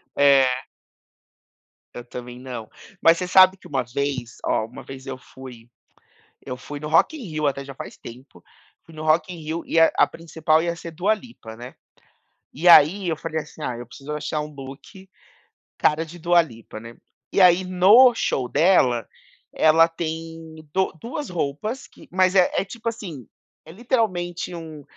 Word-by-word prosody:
É. 135 -2 +4 1.3
Eu 120 - -8
também 125 0 -9
não. 125 -4 -8 0.3
Mas 165 0 +5
você 180 - -3
sabe 185 +1 +6
que - - -15
uma 135 -3 -1
vez 130 -1 -4
ó, 110 - +1
uma 115 - -11
vez 135 0 -10
eu 135 -1 -6
fui 125 -3 -13 0.8
eu 125 -2 -5
fui 145 +3 -8
no 150 - -5
Rock 165 - +3
in 295 - -9
Rio 155 -5 -2
até 140 -1 -2
já 135 0 -10
faz - - -9
tempo. 125 +4 -13 0.4
Fui 165 - -16
no 155 0 -7
Rock 155 +3 +2
in - - -8
Rio 160 +2 -4
e - - 0
a 165 - +6
a - - +5
principal 160 -1 0
ia 170 0 -1
ser 170 0 -8
Dua 185 +7 +1
Lipa, 215 - -12
né. 125 +2 -10 0.8
E 165 +5 -2
aí 175 +3 +7
eu 160 - 0
falei, 160 0 -3
assim: 155 +1 -14
"Ah, 125 -5 -3
eu 120 - -8
preciso 140 +5 -8
achar 150 0 -3
um 150 0 -8
look 140 +8 -11 0.7
cara 155 +2 +2
de 165 +2 -12
Dua 175 +1 +4
Lipa", 115 -8 -10
né. 115 +1 -11 0.4
E - - +1
aí 180 0 +6
no 195 +8 +6
show 130 - -1
dela, 125 - +3 0.5
ela 160 +1 +5
tem 165 -1 -6 0.2
do 190 0 +1
duas 275 +5 -5
roupas 175 - -4
que - - -18
mas 185 0 +3
é 185 -2 +5
é - - 0
tipo, 230 +3 -5
assim, 170 - -8 0.4
é 160 - -12
literalmente 180 -6 -2
um 160 -3 -9
160 Hz, 180 wpm, -23 LUFS, 135-180 Hz, 1.3 s, aí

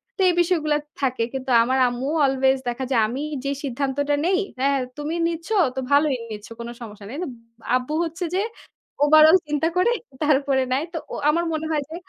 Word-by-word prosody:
তো - - -30
এই - - +2
বিষয়গুলা 310 -4 +1 0.2
থাকে। 255 -3 0
কিন্তু 265 -1 -3
আমার 260 +2 0
আম্মুও 260 +6 -2
অ্লওয়েজ 265 0 +2
দেখা 255 +2 -3
যায় 230 -3 +4
আমি 255 +5 -4 0.2
যে 280 - 0
সিদ্ধান্তটা 280 +2 -1
নেই, 375 +2 +2 0.2
"হ্যাঁ 275 0 +2 0.2
তুমি 295 +3 -3
নিচ্ছ 335 +3 -5 0.3
তো 265 - -2
ভালোই 285 -1 +4 0.2
নিচ্ছ 210 -1 -7
কোন 235 - -5
সমস্যা 210 -2 -9
নেই।" 270 - -7
কিন্তু 345 -2 -4 0.5
আব্বু 255 +4 -5
হচ্ছে 335 +2 -4
যে 390 - +2 0.6
ওভারঅল 310 +4 +7
চিন্তা 300 +2 0
করে 460 +7 +3 0.3
তারপরে 275 -2 +2
নেয় 275 +4 +1
তো - - -3 0.2
ও - - -3
আমার 340 +2 +1
মনে 315 0 -2
হয় 295 -2 0
যে, 320 - -7
285 Hz, 190 wpm, -23 LUFS, 265-315 Hz, 0.6 s, ওভারঅল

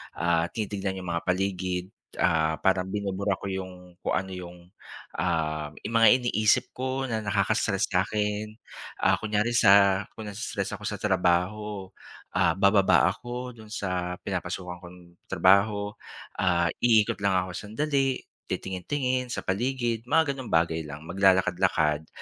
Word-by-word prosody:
ah, 85 -1 +1
tinitignan 100 -3 -3
yung 85 - -4
mga 85 - -2
paligid, 90 -1 -1 0.4
ah, 80 -1 +2
parang 95 -1 +2
binubura 100 0 -1
ko 95 +1 -6
yung 90 -2 -7
kung - - -1
ano 95 0 -2
yung 90 -1 -8 0.6
uhm 75 -2 -1
yung 115 - -4
mga 115 - +7
iniisip 110 -3 +2
ko 130 +1 -3
na 110 -1 -1
nakaka-stress 105 +1 +1
sa'kin, 105 +3 -1 0.5
ah, - - +4
kunyari 110 +2 0
sa 100 -3 +6
kung 110 -2 -7
naii-stress 100 +2 -4
ako - - -14
sa - - -2
trabaho, 95 +1 0 0.5
ah, 80 - +3
bababa 100 -3 +4
ako 125 +3 -7
dun 110 -1 -13
sa 90 -3 -2
pinapasukan 90 -1 -4
kong 90 0 -12 0.3
trabaho, 100 +3 +3 0.5
ah, 85 -2 +2
iikot 110 -3 +3
lang 100 -1 +3
ako, 90 0 0
sandali 135 +4 -1 0.2
titingin 95 -2 -4
tingin 130 -3 0
sa - - -4
paligid 120 +2 -1
mga 160 0 +3
ganong 130 -3 -7
bagay 80 0 +2
lang, 75 +1 -8
maglalakad-lakad, 90 -5 +2
95 Hz, 140 wpm, -27 LUFS, 90-110 Hz, 0.6 s, mga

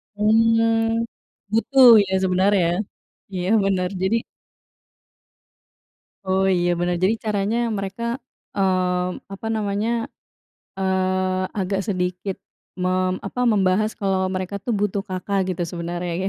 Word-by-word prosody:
Mmm, 225 +1 +3 0.5
butuh 255 +3 +5 0.2
ya 190 - -4
sebenarnya 190 +2 +3
ya, 175 - -1 0.6
iya 180 -1 -2 0.2
bener 185 -2 0
jadi 190 +4 +2 2.1
Oh 190 0 +1
iya 175 0 +1
bener 175 0 0
jadi 215 +4 +3
caranya 210 +1 0 0.2
mereka, 195 +4 -5 0.5
mmm, 185 -2 0
apa 195 +3 -6
namanya, 205 +1 -1 0.9
eee, 185 0 0 0.2
agak 195 0 -1
sedikit 180 0 -2 0.5
mem 185 0 +1
apa 245 - -4
membahas 200 +1 +2
kalau 195 -2 +1 0.2
mereka 185 +1 -3
tuh 240 - -1
butuh 205 -1 0
Kakak, 190 +2 -2
gitu 175 -1 -2
sebenarnya 175 0 -4
ya, - - +1
190 Hz, 115 wpm, -22 LUFS, 185-210 Hz, 2.1 s, butuh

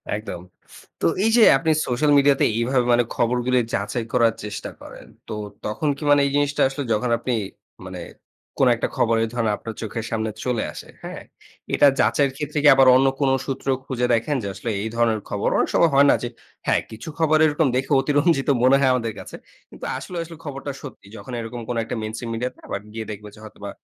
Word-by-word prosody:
একদম। 105 -5 -6 0.6
তো - - 0 0.2
এই 220 - +3
যে, 235 - +7
আপনি 160 +4 0 0.2
সোশ্যাল 140 +4 +1
মিডিয়াতে 140 -1 +4
এইভাবে 125 +1 +1
মানে 120 0 +4
খবরগুলো 125 +1 +1 0.2
যাচাই 110 +4 -2
করার 115 -2 +4
চেষ্টা 105 -1 -5
করেন। - - -11 0.2
তো - - -5 0.3
তখন 125 +8 -1
কি 150 - -8
মানে 145 0 +6
এই 140 - -1
জিনিসটা 145 0 +1
আসলে 135 +1 -4
যখন 120 +4 0
আপনি 125 +1 -2 0.5
মানে 90 -1 -7 0.6
কোনো - - +5
একটা - - -2
খবরে 115 -1 +2
ধরনে 115 -3 0
আপনার 115 - -7
চোখের 110 0 -4
সামনে 110 -1 -1 0.2
চলে 125 -3 0
আসে। - - -9 0.2
হ্যাঁ? - - -7 0.5
এটা 145 - +6
যাচাইয়ের 140 -2 +3
ক্ষেত্রে 150 +1 -3
কি - - +6
আবার 135 -1 +6
অন্য 135 +1 +4
কোনো 135 -1 +3
সূত্র 135 0 -5 0.2
খুঁজে 125 -2 -1
দেখেন 120 +6 0
যে, - - -3
আসলে 100 +5 -5
এই 110 - -3
ধরনের 115 -2 +1
খবর - - -2
অনেক - - +1
সময় 165 - +4
হয় 140 +1 +6
না - - +4
যে - - -1 0.4
হ্যাঁ, - - +3
কিছু 110 +7 -8
খবর 155 -1 +4
এরকম 150 0 +2
দেখে 130 +4 -1
অতিরঞ্জিত 145 +1 +2
মনে 130 +2 +6
হয় 135 -2 +3
আমাদের 115 -3 -1
কাছে। - - -9 0.3
কিন্তু - - -10
আসলে, 180 - -7
আসলে 165 0 -11
খবরটা 140 0 -5
সত্যি। 130 -8 -11
যখন 105 +5 -10
এরকম 115 +1 -6
কোনো 120 -1 -1
একটা 115 - -5
মেইনস্ট্রিম 110 +2 -5
মিডিয়াতে 125 +2 -4
আবার 100 - -3
গিয়ে 110 0 -5
দেখব 105 0 -8
যে, - - -16
হয়তোবা 100 -1 -9
125 Hz, 200 wpm, -22 LUFS, 115-140 Hz, 0.6 s, যে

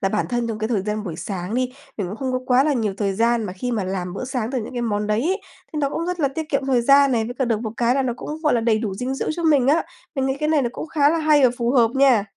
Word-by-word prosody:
là 195 - +1
bản 210 +2 -1
thân 240 -1 -1
trong 220 - -3
cái 220 0 -2
thời 215 -5 0
gian 210 +1 -3
buổi 170 -5 -5
sáng 185 +3 -4
đi, 255 0 0 0.2
mình 200 - -2
cũng 200 - -6
không 260 +1 -3
có 255 - +1
quá 255 +1 +4
là 300 - +2
nhiều 220 -6 -1
thời 200 -2 0
gian 230 +2 +2
mà 185 - -4
khi 245 +7 -4
mà 210 -4 -1
làm 185 -1 -3
bữa 250 - -4
sáng 250 -3 -3
từ 260 - -1
những 225 - -8
cái 245 - -3
món 210 -2 -1
đấy 210 +1 +1
ấy, 380 +6 0 0.3
thì 305 - -3
nó 285 -2 +1
cũng 335 +3 -3
rất 360 -1 -3
là 280 - +3
tiết 305 +3 -5
kiệm 275 -1 -1
thời 260 -3 +3
gian 275 +1 +5
này, 225 -2 +1
với 245 +2 -5
cả 265 - 0
được 225 -3 0
một 220 -2 -4
cái 240 +1 +2
là 275 - +2
nó 250 -2 -1
cũng, - - -7
gọi 300 -4 +3
là, 235 - +2
đầy 225 -1 +2
đủ 215 -4 -3
dinh 250 +6 -3
dưỡng 270 - -2
cho 340 - -5
mình 290 -6 +4
á. 315 +4 +4 0.3
Mình 265 -2 0
nghĩ 265 0 -1
cái 305 - 0
này 305 -3 +3
nó 240 - 0
cũng - - -6
khá 290 -3 +3
là 330 - +1
hay 305 -3 +4
và 250 - +6
phù 235 0 +1
hợp 240 -4 +4
nha. 265 -6 +4
245 Hz, 345 wpm, -22 LUFS, 215-275 Hz, 0.3 s, và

